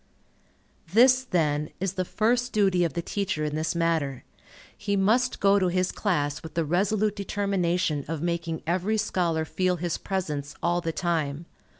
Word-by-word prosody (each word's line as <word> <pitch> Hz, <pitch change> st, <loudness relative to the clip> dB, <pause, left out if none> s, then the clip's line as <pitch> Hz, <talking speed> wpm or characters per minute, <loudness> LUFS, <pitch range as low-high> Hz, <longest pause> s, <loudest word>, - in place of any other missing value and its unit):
This, 255 Hz, +3 st, +6 dB
then, 150 Hz, -, 0 dB
is 190 Hz, 0 st, -1 dB
the 185 Hz, -1 st, -1 dB
first 245 Hz, +5 st, +1 dB
duty 190 Hz, -4 st, +3 dB
of 165 Hz, -5 st, -1 dB
the 170 Hz, -, -3 dB
teacher 195 Hz, -6 st, -2 dB
in 150 Hz, -, -3 dB
this 155 Hz, +2 st, -1 dB
matter. 160 Hz, -6 st, 0 dB, 0.5 s
He 200 Hz, -1 st, -2 dB
must 225 Hz, +6 st, +2 dB
go 200 Hz, 0 st, +4 dB
to 185 Hz, -, +2 dB
his 185 Hz, +1 st, 0 dB
class 150 Hz, -8 st, -1 dB
with 160 Hz, -1 st, -10 dB
the 165 Hz, -1 st, +1 dB
resolute 205 Hz, +5 st, +1 dB
determination 185 Hz, -6 st, -1 dB
of 160 Hz, 0 st, -3 dB
making 170 Hz, 0 st, -2 dB
every 185 Hz, +6 st, 0 dB
scholar 175 Hz, -6 st, 0 dB
feel 185 Hz, +3 st, 0 dB
his 175 Hz, -1 st, -3 dB
presence 150 Hz, -7 st, -3 dB
all 175 Hz, +1 st, +1 dB
the 165 Hz, -1 st, -2 dB
time. 160 Hz, -3 st, -2 dB
175 Hz, 165 wpm, -26 LUFS, 160-200 Hz, 0.5 s, This